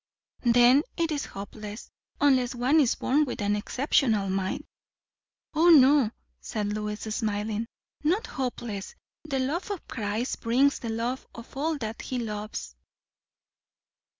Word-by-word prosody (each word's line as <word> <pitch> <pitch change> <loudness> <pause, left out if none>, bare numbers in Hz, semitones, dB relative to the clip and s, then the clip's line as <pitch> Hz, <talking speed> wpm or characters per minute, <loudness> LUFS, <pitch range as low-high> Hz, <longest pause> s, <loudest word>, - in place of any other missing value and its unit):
"Then 245 +3 +6 0.2
it 330 -1 0
is 290 -2 -1
hopeless! 210 +2 -8 0.3
unless 260 -3 +3
one 255 +6 +3
is 265 -6 +3
born 290 +4 +2
with 270 - -4
an 205 0 +1
exceptional 220 -3 +1
mind." 195 +10 -2 0.9
"O 325 +3 +5
no," 280 -5 +7 0.3
said 210 -1 -3
Lois, 210 0 -3
smiling, 215 0 -2 0.4
"not 360 +9 +1
hopeless. 240 -6 -4 0.3
The 280 -3 -2
love 290 +10 -1
of 400 -4 -5
Christ 220 +2 -3
brings 260 +5 +3
the 230 - -5
love 235 +4 -2
of 230 +2 -11
all 310 +3 0
that 225 -4 -5
he 255 - -4
loves." 210 - -5
240 Hz, 130 wpm, -27 LUFS, 210-280 Hz, 0.9 s, no